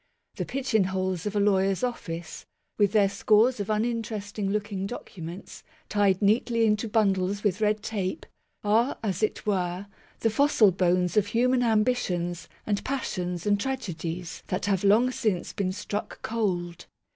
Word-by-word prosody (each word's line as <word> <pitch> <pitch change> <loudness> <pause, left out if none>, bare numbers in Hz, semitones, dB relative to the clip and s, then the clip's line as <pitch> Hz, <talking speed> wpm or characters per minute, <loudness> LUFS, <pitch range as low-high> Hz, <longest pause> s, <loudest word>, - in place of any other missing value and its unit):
The - - -2
pigeon 250 -7 +1
holes 185 -1 -2
of 205 - -4
a - - +2
lawyer's 195 0 +2
office, 175 -9 -4 0.3
with 205 -2 +4
their 205 -2 +4
scores 215 +4 +3
of 200 - -2
unin 230 +2 0
teresting 205 -2 -4
looking 205 -2 -2
documents, 175 -5 -8 0.3
tied 205 -1 +2
neatly 230 +2 +3
into 215 +1 +1
bundles 200 -2 +1
with 205 0 0
red 210 0 +1
tape, 195 -4 -3 0.4
are, 225 +5 +2
as 195 -3 -1
it 215 - -1
were, 185 -2 -1 0.4
the 225 - +2
fossil 225 -4 +4
bones 180 +1 +1
of 205 -1 +4
human 245 +4 +2
ambitions 215 -7 0 0.2
and 205 -1 -1
passions 180 -10 -3
and 205 -1 +2
tragedies 175 -9 -4
that 185 +2 -2
have 195 -2 +1
long 220 +6 +4
since 210 -8 -1
been 195 -3 -1
struck 205 +2 -5
cold. 175 -6 -2
205 Hz, 150 wpm, -27 LUFS, 185-220 Hz, 0.4 s, with